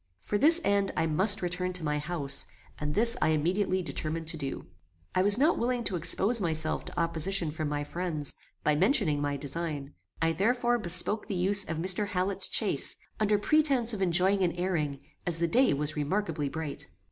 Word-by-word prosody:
For 205 - -3
this 325 +7 +6
end 200 -4 +1
I - - +1
must 190 +6 +3
return 180 +1 -2
to 180 -2 -2
my 150 -1 -1
house, 145 -3 -3 0.3
and 150 0 -3
this 230 +2 +4
I - - +2
immediately 185 +5 0
determined 165 0 -3
to 165 - -2
do. 135 -3 -6 0.5
I 185 - +2
was 205 +2 +4
not 300 +6 +2
willing 245 0 -1
to 195 - -2
expose 195 +7 +1
myself 160 -3 +1
to - - -6
opposition 170 +1 0
from 155 -1 -4
my 145 0 -3
friends, 155 -2 -2 0.3
by 150 - +2
mentioning 185 - +2
my 145 -1 -2
design; 145 0 -4 0.3
I 165 0 +1
therefore 240 +6 +1
bespoke 180 +3 +1
the 205 - -3
use 195 +3 +3
of 165 - -5
Mr. 185 +5 +5
Hallet's 185 0 -1
chaise, - - +1 0.2
under 210 -1 +2
pretence 270 -1 +2
of 205 - -5
enjoying 190 +2 +3
an 175 -2 +1
airing, 160 -6 -2 0.3
as 170 -2 +1
the 170 0 0
day 250 +10 +3
was 150 +2 -2
remarkably 150 -1 -2
bright. 160 -1 -7
180 Hz, 185 wpm, -28 LUFS, 155-205 Hz, 0.5 s, this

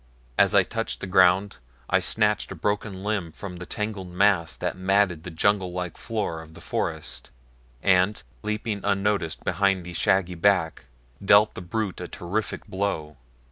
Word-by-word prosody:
As - - +4
I - - +7
touched - - -3
the - - -5
ground 95 +1 +4 0.3
I 95 - +3
snatched 105 +3 +1
a - - -5
broken 100 +1 -2
limb 100 -6 -1
from 90 +2 -8
the 90 - -8
tangled 105 -4 -4
mass 90 -2 +2
that - - -3
matted 95 -2 +2
the 90 - -7
jungle 90 +2 +1
like 90 -2 -4
floor 105 -8 -3
of 80 0 -14
the - - -11
forest - - -4 0.5
and, 95 +2 +3 0.2
leaping 105 -1 -2
unnoticed 100 -4 0
behind 95 -1 +1
the 90 - -7
shaggy 90 +1 +2
back, 85 -6 +1 0.4
dealt 100 +2 +6
the - - -7
brute 95 +1 -3
a 90 - -5
terrific 100 +7 -3
blow. 85 -6 -3
95 Hz, 160 wpm, -25 LUFS, 90-105 Hz, 0.5 s, I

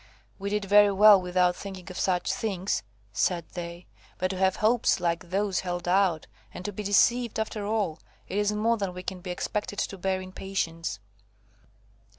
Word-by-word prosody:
"We 200 +1 -3
did 210 0 -1
very 205 +1 +6
well 205 0 +7
without 180 0 +2
thinking 190 -2 -8
of 180 - -6
such 180 -2 +1
things," 200 -5 -1 0.3
said 170 - 0
they, 170 0 -7 0.3
"but 185 - 0
to 190 - -4
have 190 0 +2
hopes 225 0 +2
like 170 0 -1
those 195 +1 0
held 175 -1 -4
out, 180 -3 +2 0.3
and 180 - -9
to 205 - -2
be 205 - -6
deceived 230 +4 +2
after 215 -1 -3
all,–it 205 -4 -4
is 205 0 +2
more 225 +2 +1
than 195 -4 -3
we 180 - -7
can 185 -1 -5
be 180 - -7
expected 205 +3 -3
to 195 - -3
bear 190 0 0
in 185 0 -9
patience." 165 - -3
190 Hz, 175 wpm, -27 LUFS, 180-205 Hz, 0.3 s, well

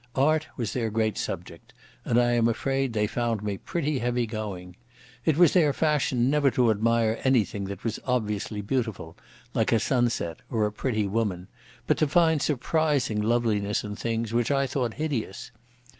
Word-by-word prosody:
Art 155 +3 +2
was 115 -5 -2
their 115 -3 -1
great 110 -1 0
subject, - - -6 0.3
and 120 - +3
I 120 0 +3
am 120 -1 +3
afraid 135 +3 0
they 105 -1 +1
found 115 -1 -2
me 100 -2 -3
pretty 150 -5 -2
heavy 120 0 0
going. 100 -5 -6 0.5
It 155 -2 +2
was 175 -3 +6
their 155 -6 +4
fashion 150 -5 +1
never 145 0 +3
to 120 -3 +3
admire 115 +1 +1
anything 110 -6 +1
that 100 +1 -7
was 115 -2 -2
obviously 105 -4 -2
beautiful, 110 -7 -3 0.4
like - - +1
a 115 - +4
sunset 120 -9 0
or 110 -3 +1
a 105 - -1
pretty 110 -2 -1
woman, 100 -3 -2 0.4
but - - +2
to 155 - +3
find 160 0 +3
surprising 140 -5 +1
loveliness 105 -3 +1
in 105 -1 -5
things 115 0 -2
which 120 -1 +1
I 140 -1 +2
thought 125 -3 -2
hideous. 135 -11 -3
115 Hz, 170 wpm, -26 LUFS, 105-135 Hz, 0.5 s, was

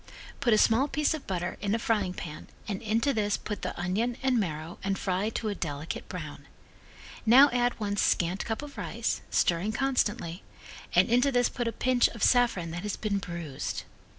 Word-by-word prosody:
Put 255 -4 +2
a 215 - +6
small 230 +6 +4
piece 300 +1 +1
of 315 - -6
butter 175 -2 -2
in 200 +1 +1
a - - +1
frying 210 -5 0
pan 155 -3 -7 0.2
and 200 -2 -3
into 230 +6 +1
this 210 -3 +1
put 210 -3 -5
the - - -4
onion 215 +8 -1
and 260 -3 +3
marrow 160 -3 -4
and 195 0 0
fry 190 +2 0
to 220 0 -3
a - - -1
delicate 145 -4 -5
brown. - - -7 0.8
Now 265 +6 +7
add 245 -1 +1
one 205 -1 -2
scant 180 0 +1
cup 225 +5 -3
of 290 -1 -9
rice, - - -2
stirring 180 +5 +1
constantly, 220 -8 0 0.5
and - - +6
into 250 +4 +3
this 245 -1 +3
put 240 -2 -3
a - - 0
pinch 250 +1 +3
of 230 - -6
saffron 235 -9 +3
that 170 +1 -4
has 210 0 -3
been 205 -2 -1
bruised. 170 -7 -5
215 Hz, 190 wpm, -28 LUFS, 185-245 Hz, 0.8 s, Now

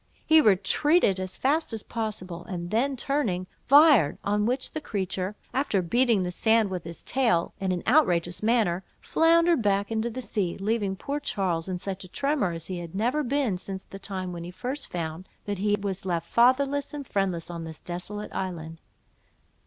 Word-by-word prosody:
He 315 0 +6
retreated 205 - +3
as 185 0 -5
fast 300 +3 +1
as 220 - -4
possible, 190 -7 -5
and 175 -1 -5
then 260 +5 +1
turning, 235 -10 -1 0.2
fired, 280 - +6
on 210 +1 +1
which 255 +2 -1
the 310 - -4
creature, 190 -4 -3 0.2
after 240 -9 +1
beating 230 +2 +3
the 180 - -2
sand 220 +1 +2
with 180 -3 -4
his 170 0 -8
tail 230 -10 +1
in 190 -1 -1
an 180 -1 -2
outrageous 180 - +2
manner, 215 -5 +2 0.2
floundered 335 -1 +3
back 200 0 +1
into 225 +1 0
the 240 +3 -6
sea, 205 -7 -2
leaving 205 -1 0
poor 280 +9 -3
Charles 190 - -1
in 185 - -2
such 195 +1 -5
a - - -10
tremor 275 - 0
as 165 -1 -5
he 185 -2 -4
had 170 0 -8
never 245 +9 +1
been 265 -8 0
since 190 0 -6
the 195 - -11
time 185 -2 -4
when 170 -1 -6
he 175 - -7
first 250 +10 -5
found 165 +1 -5 0.2
that 205 -2 -3
he 205 +1 +2
was 195 -2 -3
left 170 -3 -2
fatherless 275 +4 +2
and 285 -1 -6
friendless 185 -6 -1
on 170 -1 -5
this 160 -1 -8
desolate 180 +4 -6
island. 165 -3 -5
200 Hz, 185 wpm, -27 LUFS, 180-250 Hz, 0.2 s, He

